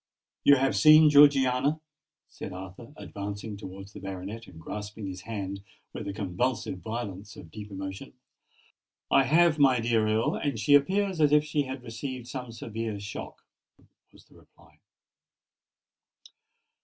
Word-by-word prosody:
"You 145 - +7
have 135 0 +1
seen 155 -1 +7
Georgiana?" 140 0 +5 0.5
said 95 - -8
Arthur, 95 +6 -10
advancing 100 -1 -6
towards 100 0 -10
the - - -9
baronet 95 +4 -7
and 80 -3 -13
grasping 105 +4 -7
his 95 -1 -6
hand 100 -2 -5 0.3
with 110 - -6
the 100 - -3
convulsive 100 +1 -2
violence 105 -2 -6
of 80 - -12
deep 105 +2 -9
emotion. 95 +5 -7 1.0
"I 135 - +5
have, 160 +3 +4
my 130 -3 +5
dear 115 -2 +1
Earl; 110 +1 +1
and 140 -5 -2
she 110 +7 +3
appears 185 +5 +3
as 150 -1 +4
if 150 0 +5
she 145 -1 -1
had 130 -1 -7
received 125 +1 -6
some 125 -2 -6
severe 115 -2 -5
shock," 100 0 -8 0.7
was - - -20
the - - -24
reply. - - -22
115 Hz, 145 wpm, -28 LUFS, 100-140 Hz, 1.0 s, You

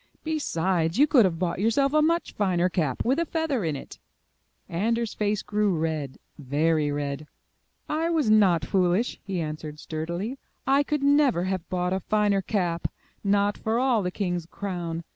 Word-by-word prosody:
Besides, 185 - 0
you 285 - +7
could 270 -7 +5
have 175 -3 0
bought 175 0 -1
yourself 250 +7 +2
a 305 - +5
much 335 +2 +1
finer 185 -3 +1
cap 155 -8 -1
with 265 +6 +2
a 335 - +1
feather 320 - -1
in 160 -3 -1
it." 135 - -9 0.7
Anders' 225 +6 -1
face 210 -1 -1
grew 210 -4 +1
red, 155 -4 -2 0.2
very 150 +2 +1
red. 145 +1 -3 0.6
'1 320 +2 -1
was 315 -7 +1
not 195 -7 +4
foolish," 185 +5 +1
he 195 -3 -3
answered 155 -1 -5
sturdily, 170 - -4 0.3
*'I 275 +2 +4
could 295 0 -1
never 280 - +4
have 185 -2 -3
bought 180 0 0
a 190 - 0
finer 205 0 +1
cap, 175 -4 -1 0.4
not 200 0 +2
for 220 +1 0
all 250 -3 +2
the 180 - -1
king's 180 -3 -3
crown. 175 -4 -4
190 Hz, 165 wpm, -26 LUFS, 165-235 Hz, 0.7 s, you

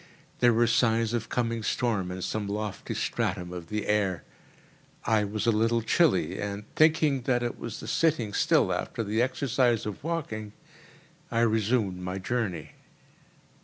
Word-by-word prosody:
There 120 -1 +5
were 120 +1 +3
signs 115 -1 +2
of 115 -2 -2
coming 115 -2 -1
storm 105 -5 0
in 90 0 -5
some 105 -2 -2
lofty 105 0 -4
stratum 90 -1 -2
of 85 -2 -7
the 105 -1 -2
air. 100 -4 0 0.8
I 110 -2 +3
was 105 +2 -3
a 115 - +4
little 115 +1 +1
chilly, - - +2
and, 100 0 -4
thinking 155 -3 +4
that 120 -1 +2
it 120 - -3
was 115 - -6
the - - -8
sitting 120 -6 +1
still - - +3
after 115 - -3
the 110 +2 0
exercise 125 -2 +1
of 105 +3 -6
walking, 115 -11 -4 0.8
I 115 - +1
resumed 110 -4 +1
my 90 +1 -4
journey. 95 - -3
110 Hz, 155 wpm, -28 LUFS, 105-120 Hz, 0.8 s, There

